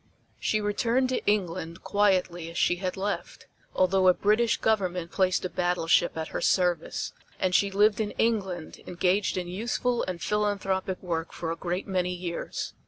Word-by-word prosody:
She 215 - +1
returned 230 +5 +1
to 255 - -1
England 170 -5 -1
quietly 185 -5 +1
as 170 - -8
she 175 - +2
had 185 +1 -3
left, 200 +1 -4 0.3
although 185 0 +3
a 180 - +6
British 215 +2 +2
Government 185 -6 0
placed 185 -1 +1
a - - +2
battleship 175 -2 +1
at 160 0 -3
her - - -4
service 180 -2 +1 0.3
and 185 -1 +1
she 200 +2 +4
lived 205 +2 +3
in 210 - -1
England 195 -8 -1
engaged 185 +3 +1
in 180 -1 -2
useful 235 +5 -1
and 180 -2 -4
philanthropic 195 -2 -1
work 165 -2 -2
for 165 -1 -4
a - - -2
great 180 +2 -3
many 180 -2 0
years. 175 -1 -4
185 Hz, 165 wpm, -27 LUFS, 175-205 Hz, 0.3 s, a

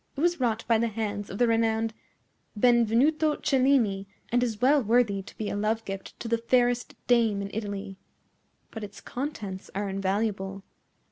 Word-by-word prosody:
It - - -2
was 345 0 +2
wrought 230 -2 0
by 230 -2 +4
the 235 - +2
hands 210 -2 -3
of 195 - -6
the 245 - +3
renowned 225 -1 +1 0.7
Benvenuto 250 +7 +4
Cellini, 255 -8 +2 0.2
and 245 +2 +2
is 230 -4 -1
well 275 +4 +4
worthy 220 -3 +2
to 190 - -14
be 215 - -3
a - - -2
love 220 +2 -1
gift 195 0 -7
to - - -4
the 230 0 +1
fairest 245 0 +1
dame 230 -4 +3
in 200 0 -5
Italy. 200 -3 -5 0.7
But 220 - -7
its 205 - -8
contents 215 -9 -5
are 205 +1 -1
invaluable. 195 0 -2
225 Hz, 165 wpm, -27 LUFS, 200-245 Hz, 0.7 s, by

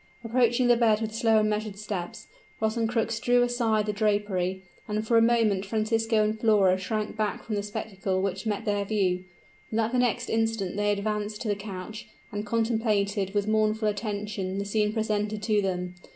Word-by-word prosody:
Approaching 240 +1 +2
the 240 - +6
bed 225 -2 +3
with 220 -1 -3
slow 225 0 +3
and 215 0 +3
measured 210 -1 -3
steps, 200 -4 -5 0.3
Rosencrux 225 0 0
drew 245 +1 +3
aside 230 -3 +1
the 210 - -1
drapery; 200 -3 0 0.2
and 215 0 -2
for 235 - +3
a 230 - +7
moment 225 -4 +3
Francisco 220 +1 +1
and 215 +1 -1
Flora 205 -5 +4
shrank 210 +3 -3
back 215 -1 -2
from 220 - -5
the 205 - 0
spectacle 195 -2 -3
which 195 +3 -2
met 205 -2 -2
their 205 -1 +1
view; 190 -3 0 0.5
but 220 - 0
at 225 0 +1
the 250 - +1
next 240 -1 +1
instant 225 -4 0
they 205 0 +1
advanced 210 +1 -2
to - - -4
the 205 - +1
couch, 200 +1 -7 0.2
and 205 0 -4
contemplated 210 -3 0
with 205 0 +1
mournful 215 0 +2
attention 205 -2 -3
the 200 - -2
scene 210 +1 +1
presented 210 -1 -1
to 210 -1 +2
them. 180 -2 -2
215 Hz, 180 wpm, -27 LUFS, 205-225 Hz, 0.5 s, a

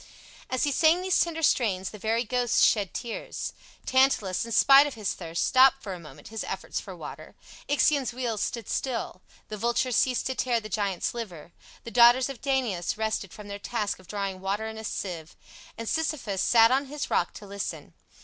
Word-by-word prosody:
As 255 - 0
he 290 - +2
sang 325 +5 +3
these 375 -1 +2
tender 325 -1 0
strains, 195 -10 +1
the 210 - -10
very 225 +3 0
ghosts 245 0 +1
shed 205 -5 +2
tears. 235 -2 -5 0.3
Tantalus, 260 -8 +2
in 230 - -7
spite 275 +5 +7
of 285 - -7
his 215 -3 -2
thirst, 170 -1 -3
stopped 270 +1 +5
for 195 - -5
a 180 - -8
moment 160 +3 -13
his 220 0 -4
efforts - - -4
for - - -9
water, - - -10 0.3
Ixion's 285 -2 +2
wheel 240 -3 -3
stood 235 +2 -3
still, 235 -7 -3 0.3
the 215 - -5
vulture 240 +3 0
ceased 250 +1 +1
to 260 - -1
tear 245 -2 0
the 215 -1 -9
giant's 200 -3 -1
liver, 180 -9 -7 0.3
the 230 - -8
daughters 245 +2 +6
of 270 -4 -8
Danaus 245 -11 -1
rested 215 -4 -2
from 210 -1 -11
their 200 0 -6
task 210 -2 -3
of 185 - -18
drawing 195 -2 -4
water 200 +3 -2
in 220 0 -7
a - - -8
sieve, 175 -6 -5 0.4
and 230 0 -6
Sisyphus 285 -12 -1
sat 230 +3 +5
on 270 +2 +2
his 295 +1 -5
rock 175 - +1
to 210 - -10
listen. 200 0 -6
230 Hz, 195 wpm, -27 LUFS, 200-260 Hz, 0.4 s, spite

